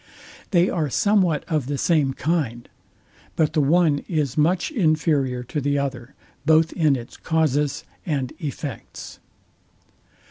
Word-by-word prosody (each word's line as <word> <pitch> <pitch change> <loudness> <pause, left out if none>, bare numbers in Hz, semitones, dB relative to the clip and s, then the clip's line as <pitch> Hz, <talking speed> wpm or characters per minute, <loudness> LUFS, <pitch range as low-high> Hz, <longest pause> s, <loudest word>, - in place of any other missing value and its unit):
They 175 -1 +3
are 160 -6 -1
somewhat 185 - +2
of 155 -7 -1
the 145 0 -2
same 145 -4 +2
kind: 135 -7 -1 0.7
But 155 -2 +1
the 155 - +2
one 155 0 +3
is 150 -7 -1
much 175 - +1
inferior 155 - +1
to 145 +4 -4
the 145 +1 0
other, 135 -2 -4 0.3
both 160 +1 +3
in 155 -5 +3
its 120 -1 -8
causes 150 -2 0 0.2
and 140 -6 -2
effects. 145 -5 -7
150 Hz, 130 wpm, -23 LUFS, 140-165 Hz, 0.7 s, They